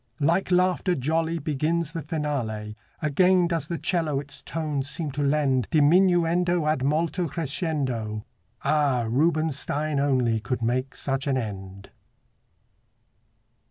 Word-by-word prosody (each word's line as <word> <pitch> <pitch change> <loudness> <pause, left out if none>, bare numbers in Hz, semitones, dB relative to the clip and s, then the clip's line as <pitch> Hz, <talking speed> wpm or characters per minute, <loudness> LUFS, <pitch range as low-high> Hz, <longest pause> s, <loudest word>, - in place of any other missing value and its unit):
Like 170 +6 +2
laughter 180 0 +2
jolly 160 +4 0
Begins 155 +2 -1
the 165 - -3
finale; 135 -9 -3 0.3
Again 180 +4 +4
does 165 -4 -2
the 170 - -3
'cello 160 -6 0
its 145 0 -6
tones 150 -3 -3
seem 155 -4 -2
to 145 +2 -3
lend 140 -3 +2
Diminuendo 175 +1 +3
ad 155 -4 +1
molto 165 +5 0
crescendo. 135 - -2 0.4
Ah! 140 -5 +2
Rubinstein 155 +1 0
only 130 -5 +2
could 115 +3 -3
make 130 +3 -1
such 135 0 -2
an 135 -1 +1
end! 100 -4 -6
150 Hz, 120 wpm, -25 LUFS, 130-165 Hz, 0.4 s, Again